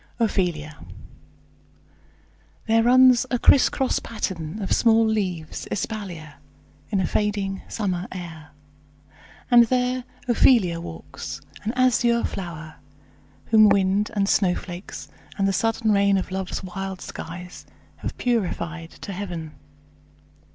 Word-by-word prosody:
OPHELIA 175 -9 -1 1.9
There 225 0 +3
runs 255 +1 +6
a 245 - +1
crisscross 265 +1 +3
pattern 190 -5 -4
of 195 - -4
small 225 -1 +4
leaves 185 -8 -2
Espalier, 180 -9 -5 0.5
in 200 - 0
a 185 - +1
fading 200 -1 -1
summer 185 -4 -2
air, 165 -4 -8 1.0
And 240 -1 +8
there 250 +1 0 0.2
Ophelia 220 -8 +4
walks, 80 - -8 0.2
an 215 - -1
azure 245 -2 +3
flower, 165 -4 -6 0.7
Whom 215 -2 +7
wind, 200 +1 +2
and 200 -1 +1
snowflakes, 180 -1 -1 0.3
and 195 -1 +2
the 195 - +1
sudden 225 +2 +1
rain 200 -1 +3
Of 185 - -3
love's 190 0 -4
wild 190 0 -5
skies 180 +2 -8 0.3
have - - -6
purified 175 -8 -2
to 200 - -6
heaven. 175 -5 -5
195 Hz, 110 wpm, -24 LUFS, 175-225 Hz, 1.9 s, And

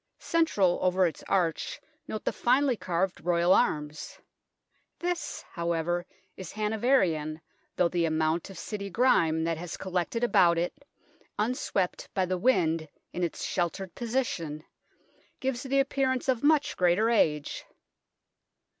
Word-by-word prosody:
Central 210 - +2
over 185 0 +3
its 165 -4 -3
arch 175 -4 0 0.3
note 215 - -5
the - - 0
finely 260 +1 +2
carved 185 -1 -2
Royal 175 +1 +3
arms. 150 0 0 0.8
This, 350 0 -3
however, 170 +1 -1 0.3
is 190 - -8
Hanoverian, 210 - +1 0.4
though 180 - +3
the 170 -1 0
amount 160 +2 0
of 195 - -10
City 200 -2 -5
grime 165 -8 +3
that 165 -1 -1
has 175 0 -6
collected 185 +5 -2
about 175 -7 +4
it, 175 +1 -1 0.6
unswept 210 -4 -1
by 190 - +2
the 185 0 -2
wind 165 - +2 0.2
in 180 - -2
its 170 - -2
sheltered 175 +1 -2
position, 220 - -2 0.8
gives 260 -2 -2
the 275 +1 +1
appearance 270 +1 0
of 255 -3 +1
much 295 0 +3
greater 185 +6 +3
age. 150 -10 +1
185 Hz, 130 wpm, -28 LUFS, 170-240 Hz, 0.8 s, about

